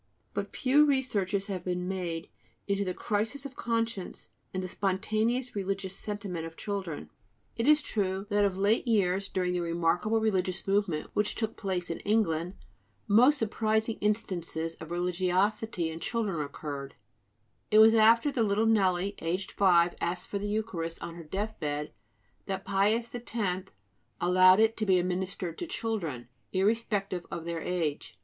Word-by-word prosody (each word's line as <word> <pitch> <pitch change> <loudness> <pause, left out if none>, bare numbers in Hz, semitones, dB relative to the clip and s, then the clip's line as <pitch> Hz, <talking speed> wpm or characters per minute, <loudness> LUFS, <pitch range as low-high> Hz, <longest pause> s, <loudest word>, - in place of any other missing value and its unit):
But - - -4
few 275 +2 +4
researches 205 -8 0
have 190 -4 -4
been 180 0 -2
made 175 -3 -3 0.4
into 200 0 +1
the 185 - -2
crises 225 +6 -2
of 270 -2 -7
conscience 230 -4 -3 0.2
and 185 0 -3
the - - -3
spontaneous 215 +7 -1
religious 195 -1 -2
sentiment 200 -6 -5
of 165 - -13
children. 195 -7 -4 0.4
It 230 +3 -1
is 300 0 +6
true 195 -4 -1
that 205 0 +3
of 195 -2 +1
late 205 +6 +2
years, 195 -3 +2
during 180 -1 0
the 180 - 0
remarkable 170 +6 +1
religious 190 -4 0
movement 195 -6 0
which 210 0 +1
took 220 -1 -2
place 185 -4 -2
in 165 - -4
England, 185 -5 0 0.5
most 245 +8 +6
surprising 220 -1 0
instances 175 -6 -1
of 160 - -8
religiosity 180 +2 0
in 160 - -7
children 200 -4 -1
occurred; 140 -1 -6 0.7
it 215 - +4
was 220 +1 +8
after 230 +5 +5
the 250 - 0
little 215 0 +2
Nelly, 195 -3 +2
aged 180 +4 -2
five, 175 -3 +4
asked 175 +1 -1
for 200 - -2
the 205 - -3
Eucharist 205 -6 -2
on 170 - -5
her 170 0 -9
death 205 +7 -4
bed 150 -1 -3 0.5
that 190 0 -3
Pius 210 +4 +1
X 200 -6 -3 0.5
allowed 185 +2 +6
it 225 0 +4
to 215 - -1
be 190 -1 +5
administered 180 -1 -2
to 350 - -4
children, 180 - -3 0.3
irrespective 200 -2 0
of 170 -1 -5
their 170 -1 -3
age. 160 - -2
195 Hz, 155 wpm, -29 LUFS, 175-220 Hz, 0.7 s, was